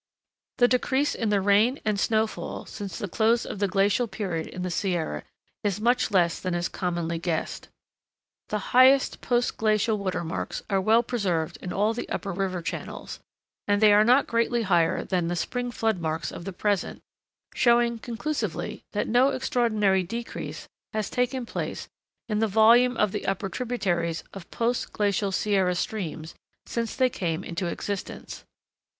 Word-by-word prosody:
The 245 - +6
decrease 265 +3 +1
in 225 - -1
the 205 -1 +2
rain 205 +7 +3
and 210 -2 +1
snow 220 +1 +2
fall 220 - -6
since 200 -4 -7
the 205 - -3
close 225 +5 +2
of 200 - -6
the 200 - +2
glacial 200 +5 +2
period 180 -7 -3
in 180 - -6
the 180 - -2
Sierra 175 -3 -1 0.4
is 205 -2 0
much 240 +3 +2
less 175 -4 +2
than 185 -2 -2
is 175 +1 0
commonly 170 -3 -2
guessed. 165 -2 -3 0.8
The 210 -1 -4
highest 260 +2 +5
post 245 0 0
glacial 215 0 +2
watermarks 180 -4 -3
are 195 -1 +2
well 225 +4 +4
preserved 185 -10 -1
in 180 - -5
all 210 +3 +1
the 240 - -5
upper 200 - -3
river 185 -2 -2
channels, - - -6 0.5
and 205 0 +3
they 210 -1 +6
are 210 +1 +6
not 250 +5 +5
greatly 230 0 +1
higher 175 -5 +2
than 180 -3 -1
the 175 - -1
spring 245 +8 -2
floodmarks 175 -9 -1
of 170 - -8
the 195 - -4
present; 200 +1 -1 0.5
showing 235 -1 +3
conclusively 230 - -3
that 205 - -1
no 245 +4 +4
extraordinary 235 -8 +1
decrease 230 +6 -6 0.3
has 215 -2 -2
taken 250 0 0
place - - -4 0.4
in 210 -2 0
the 225 - +2
volume 230 +4 +5
of 210 -2 +2
the - - -4
upper 195 0 -1
tributaries 180 -8 -1
of 195 -3 -10
post 235 +1 -1
glacial 200 -1 0
Sierra 190 -2 +1
streams 165 -3 -4 0.3
since 230 -1 -3
they 260 - +4
came 175 -7 -3
into 175 +1 -3
existence. 200 +3 -5
205 Hz, 160 wpm, -26 LUFS, 180-235 Hz, 0.8 s, The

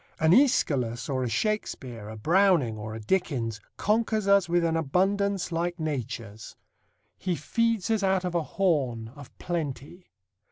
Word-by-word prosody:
An 160 0 +4
Æschylus 135 - +2
or 130 -1 0
a 125 - -1
Shakespeare, 125 - -2
a 110 - -8
Browning 170 - +3
or 110 +1 -6
a - - -6
Dickens, 115 - -1 0.2
conquers 215 -1 +1
us 200 -3 +4
with 175 0 +2
an 165 -1 +1
abundance 190 +5 0
like 170 +1 -2
nature's. 115 -8 -5 0.6
He 185 -2 -1
feeds 230 +1 0
us 220 -2 +2
out 190 -1 +1
of 180 - -2
a 170 - +1
horn, 140 - 0
of 140 +2 -14
plenty. 165 0 -5
165 Hz, 150 wpm, -27 LUFS, 125-195 Hz, 0.6 s, An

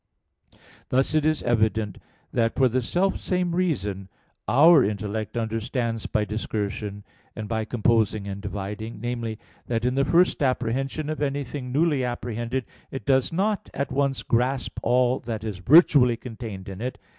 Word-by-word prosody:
Thus 135 +3 +2
it 155 -1 +3
is 155 -1 0
evident 110 -3 +1 0.3
that 115 -1 +1
for 130 - +4
the 125 +1 0
self 185 +10 0
same 180 -2 -1
reason 105 - -1 0.4
our 145 - +7
intellect 105 +2 -3
understands 115 0 -2
by 105 - 0
discursion, 105 -1 -4 0.3
and 110 -1 -5
by 110 0 -1
composing 110 -3 +1
and 100 0 -5
dividing, 105 +3 -5
namely, 120 -2 -3 0.3
that 115 -1 -1
in 125 - +2
the 135 +1 +2
first 175 +3 +3
apprehension 135 +3 -1
of 155 0 -3
anything 140 -2 -3
newly 145 -1 +2
apprehended 120 +1 -3 0.2
it 135 - -7
does 135 -2 +2
not 200 +4 -1
at 140 - -2
once 140 -1 0
grasp 125 +2 0
all 125 +1 +2
that 110 -2 -5
is 105 -5 -4
virtually 125 - +6
contained 110 -5 -8
in 95 +1 -7
it. 125 +2 -3
120 Hz, 150 wpm, -25 LUFS, 110-135 Hz, 0.4 s, our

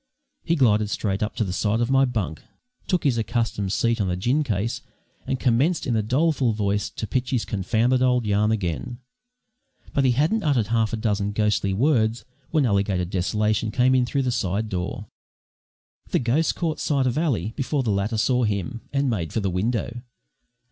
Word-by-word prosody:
He 170 - +1
glided 110 -7 +3
straight 100 -2 -2
up 105 - -2
to - - 0
the 95 -3 -3
side 105 +4 0
of 120 +2 0
my 135 0 +5
bunk, 105 - -3 0.5
took 180 -3 +1
his 125 -5 +2
accustomed 110 -3 -1
seat 115 +2 +1
on 95 - 0
a 90 - 0
gin 125 +11 +1
case, 110 -3 -2 0.5
and 130 - -1
commenced 135 +7 +2
in 120 - 0
a 110 - +2
doleful 130 +1 +1
voice 105 -1 -1
to - - -5
pitch 125 +4 -2
his 125 -4 0
confounded 115 +6 +1
old 125 -2 +2
yarn 105 +1 +2
again; 105 +3 -2 1.0
but 140 - +2
he 130 -2 +4
hadn't 155 - +1
uttered 130 - +1
half 115 -2 +1
a 115 - -2
dozen 105 -2 -1
ghostly 105 -2 +1
words 115 0 +1 0.2
when 155 -4 +2
Alligator 100 -4 +1
Desolation 105 +4 0
came 125 +4 +3
in 125 -2 +3
through 135 +2 0
the 125 - 0
side 110 -1 -1
door. 95 +2 -4 1.0
The - - +2
ghost 130 +7 +1
caught 160 -3 -2
sight 140 -3 +1
of 125 -1 0
Ally 135 - 0
before 140 0 -1
the 110 - 0
latter 100 +3 -1
saw 125 +3 +2
him, 105 +3 -2
and 140 0 +1
made 95 -10 -2
for - - -1
the 100 -3 -1
window. 115 +5 -2
115 Hz, 190 wpm, -24 LUFS, 105-130 Hz, 1.0 s, my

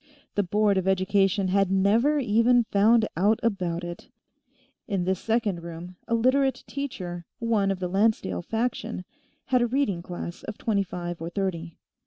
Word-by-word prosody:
The 205 - +2
Board 205 +1 +2
of 185 - -3
Education 195 0 +2
had 195 0 +2
never 215 +10 +3
even 240 -1 +3
found 220 +2 +4
out 205 +5 +3
about 180 -6 -1
it. 175 0 -8 0.8
In 195 -3 -1
this 190 0 0
second 220 -6 0
room, 170 +2 -8
a 230 - +1
Literate 260 +3 +2
teacher, 180 - -5
one 225 -4 +1
of 195 -1 -1
the 180 - -2
Lancedale 190 - +1
faction, 225 - -3 0.4
had 255 -2 +2
a 240 - +2
reading 235 -8 0
class 175 0 -7
of 215 - -7
twenty 210 -3 0
five 175 -3 -5
or 165 - -4
thirty. 175 -3 -3
200 Hz, 160 wpm, -26 LUFS, 180-230 Hz, 0.8 s, found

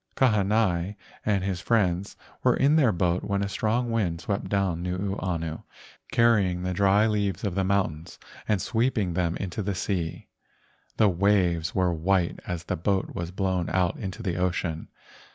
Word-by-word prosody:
Kahanai 105 -5 +2 0.3
and 100 -3 +1
his 95 -2 -2
friends 95 -5 +1 0.3
were - - +4
in 140 +3 +4
their 140 -8 +4
boat 90 -1 0
when 100 0 -1
a - - -1
strong 115 +4 0
wind 95 -8 0
swept 100 +2 -3
down 95 -4 0
Nuuanu, 90 -3 -3 0.5
carry¬ 115 -3 +4
ing 90 -1 -2
the 90 0 -1
dry 100 +3 +4
leaves 100 -4 0
of 100 -4 -1
the 95 +1 0
mountains 95 -5 -1 0.3
and 105 -2 +2
sweep¬ 120 +6 0
ing 95 -5 0
them 85 -1 0
into 95 +2 -4
the 100 -1 -2
sea. 90 -3 -3 0.7
The 110 - +5
waves 90 -3 +2
were 90 -2 +2
white 85 +1 +1
as 85 -2 -3
the - - -2
boat 95 +3 0
was 85 0 -4
blown 95 -2 -1
out 90 -2 +1
into 100 +3 -5
the 90 -4 -2
ocean. 90 -3 -1
95 Hz, 170 wpm, -26 LUFS, 90-105 Hz, 0.7 s, The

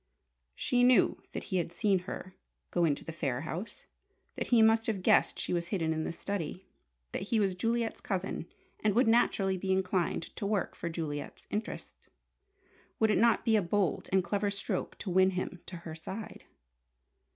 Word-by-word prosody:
She 245 0 +2
knew 245 -5 +5
that - - -5
he 185 - -2
had 170 -1 -1
seen 195 +2 +2
her 185 0 -7 0.4
go 175 -1 +3
into 145 -3 0
the - - -5
Phayre 135 -5 -2
house; 175 +7 -6 0.5
that - - -3
he 235 -2 +5
must 225 0 +4
have 200 -5 -1
guessed - - +4
she - - -1
was 170 -1 -1
hidden 165 -4 0
in 160 0 -2
the - - -2
study; 185 0 -4 0.5
that - - -3
he 230 -3 +3
was 195 -3 +2
Juliet's 230 +4 -1
cousin 190 -3 -3 0.4
and 210 -2 +3
would 245 0 +4
naturally 200 -4 +3
be 190 +1 -1
inclined 185 -2 0
to - - -3
work 200 -3 0
for 170 - -4
Juliet's 155 -3 -5
interest. 210 +2 -5 0.9
Would 220 -1 +4
it - - +3
not 235 -1 +4
be 225 - +4
a 215 - +4
bold 190 0 0
and 190 -1 +4
clever 200 +3 0
stroke 200 0 -3
to 190 - -4
win 190 +1 +5
him 180 -1 -3
to 185 - -6
her 160 - -5
side? 190 +7 -7
190 Hz, 185 wpm, -31 LUFS, 170-215 Hz, 0.9 s, knew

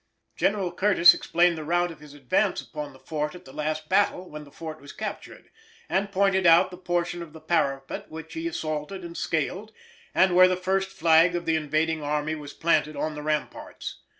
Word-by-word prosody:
General 190 -4 0
Curtis 185 -1 +6
explained 170 -1 +1
the - - -5
route 175 +2 +1
of 160 - -12
his 150 -1 -13
advance 135 -4 0
upon 150 -1 -7
the 135 - -16
fort 150 +3 -4
at 180 - -13
the 130 - -13
last 155 +1 -3
battle, 185 -1 +1
when 150 -2 -9
the 145 - -17
fort 155 0 -8
was 140 - -11
captured, 215 -1 -7 0.4
and 200 +1 -1
pointed 190 -2 +2
out 175 +3 +6
the 180 - -9
portion 175 -1 -2
of 160 -3 -9
the 160 - -11
parapet 140 -4 -1
which 160 0 -9
he 330 +1 -3
assaulted 155 - -4
and 170 0 -9
scaled, 185 +9 -2 0.4
and 185 -1 +4
where 185 0 +8
the 185 0 0
first 190 +1 0
flag 165 0 +4
of 175 - -3
the 160 - +2
invading 155 +1 0
army 150 +1 -1
was 150 -2 -7
planted 155 -2 +1
on 155 +2 -2
the 150 - -6
ramparts. 155 0 -4
165 Hz, 200 wpm, -26 LUFS, 150-185 Hz, 0.4 s, where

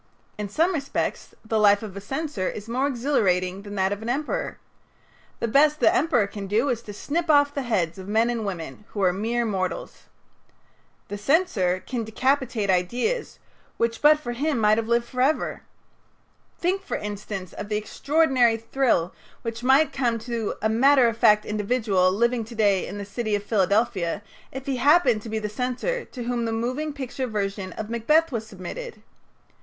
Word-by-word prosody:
In 210 -1 -5
some 330 - +2
respects 280 -4 -3
the 220 0 0
life 205 0 +5
of 200 -3 -7
a 200 - -6
censor 270 - -3
is 210 +1 -7
more 255 +4 0
exhilarating 195 -9 0
than 205 0 -8
that 190 0 +1
of 205 +1 -3
an 225 - -4
emperor. 300 - -2 0.8
The - - -1
best 295 +6 +4
the 330 - +4
emperor 305 - +3
can 200 0 -7
do 225 +8 +1
is 235 -3 -1
to 215 - -9
snip 320 +10 -3
off 285 -1 +5
the 280 - -2
heads 190 -9 -1
of 190 - -9
men 225 +3 +2
and 230 -2 -2
women, 180 -2 -6
who 205 - -1
are 180 -1 +4
mere 230 +5 -1
mortals. 190 -4 -3 1.0
The 205 - -5
censor 205 - +1
can 245 -3 -3
decapitate 235 -2 0
ideas 240 - -1 0.4
which 230 0 -1
but 300 +1 +6
for 240 -5 -5
him 285 +4 -1
might 215 0 +4
have 225 - -3
lived 235 0 +2
forever. 255 +5 0 1.0
Think, 370 +3 0
for - - -3
instance, 205 -3 -6
of 205 - -7
the 210 - 0
extraordinary 260 0 +2
thrill 230 -6 0 0.3
which 230 0 -4
might 270 +5 +4
come 240 -4 0
to 235 -3 -2
a - - +4
matter 255 +3 +5
of 225 - -4
fact 210 -2 +4
individual 210 -3 +1
living 235 +4 +1
to 230 +2 -11
day 200 -4 +2
in - - -6
the 200 - -5
city 215 +1 -2
of 205 - -3
Philadelphia 200 -3 +1 0.3
if 265 0 -7
he 270 -2 -1
happened 275 -5 +4
to 225 - -8
be 220 - -2
the 215 -1 -2
censor 255 - -2
to 245 - -8
whom 240 0 -1
the 225 - -1
moving 255 +7 -2
picture 265 -2 -4
version 200 -3 -3
of 215 - -5
"Macbeth" 300 +8 +2
was 225 -3 -3
submitted. 215 - -8
230 Hz, 180 wpm, -24 LUFS, 205-270 Hz, 1.0 s, but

